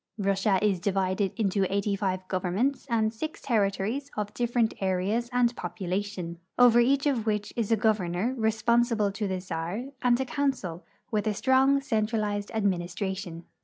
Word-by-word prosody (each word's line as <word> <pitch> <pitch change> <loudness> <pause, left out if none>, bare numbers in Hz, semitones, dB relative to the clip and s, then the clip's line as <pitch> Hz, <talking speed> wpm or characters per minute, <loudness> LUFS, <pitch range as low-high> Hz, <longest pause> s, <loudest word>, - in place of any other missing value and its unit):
Russia 195 -1 +2
is 200 -4 +2
divided 190 +1 0
into 195 -3 +1
eighty 200 0 0
five 185 -2 -2
governments 190 +11 -1
and 220 -2 +1
six 310 +8 -5
terri 210 -6 +2
tories 235 +9 -3
of 210 -1 -3
different 240 -2 +1
areas 195 +5 0
and 245 -1 +2
population, 180 -1 -4 0.2
over 245 -1 +7
each 275 +4 +3
of 250 -6 0
which 210 -1 -1
is 230 -2 -1
a 225 - +4
governor, 210 +1 +1
responsible 225 -1 +2
to 205 +1 -3
the 190 -1 -2
czar, 180 +4 -4 0.2
and 245 0 +3
a 265 - 0
council, 250 - -2 0.3
wdth 210 0 0
a 215 - +2
strong 265 +4 +4
centralized 215 -4 -1
administration. 185 -2 -2
210 Hz, 155 wpm, -27 LUFS, 190-235 Hz, 0.3 s, over